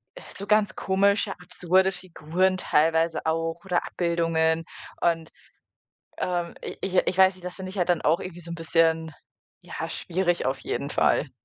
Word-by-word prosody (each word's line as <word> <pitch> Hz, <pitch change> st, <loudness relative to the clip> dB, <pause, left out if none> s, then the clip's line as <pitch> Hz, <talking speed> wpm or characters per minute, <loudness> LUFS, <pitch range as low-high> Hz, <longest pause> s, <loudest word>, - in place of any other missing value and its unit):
äh, -, -, -10 dB, 0.2 s
so 200 Hz, -, -5 dB
ganz 210 Hz, -1 st, +3 dB
komische 200 Hz, +1 st, +2 dB
absurde 180 Hz, +1 st, +1 dB
Figuren 180 Hz, +1 st, -1 dB
teilweise 165 Hz, 0 st, +1 dB
auch 165 Hz, +1 st, -1 dB
oder 180 Hz, -2 st, 0 dB
Abbildungen 165 Hz, -1 st, 0 dB, 0.4 s
und, 165 Hz, -1 st, +1 dB, 0.9 s
ähm, 175 Hz, -1 st, -2 dB
i -, -, -6 dB
ich 190 Hz, -, -3 dB
ich 185 Hz, -, 0 dB
weiß 190 Hz, 0 st, +6 dB
nicht, 185 Hz, -, -15 dB
das 180 Hz, -, -5 dB
finde 185 Hz, -1 st, -6 dB
ich 195 Hz, -, -8 dB
halt 180 Hz, -, +1 dB
dann 175 Hz, -2 st, +2 dB
auch 165 Hz, +4 st, +2 dB
irgendwie 175 Hz, -2 st, -7 dB
so 170 Hz, -, -7 dB
'n -, -, -3 dB
bisschen, 160 Hz, 0 st, +2 dB, 0.5 s
ja, -, -, -5 dB
schwierig 175 Hz, 0 st, -1 dB
auf 135 Hz, +1 st, -1 dB
jeden -, -, -3 dB
Fall. -, -, +2 dB
175 Hz, 170 wpm, -26 LUFS, 165-185 Hz, 0.9 s, weiß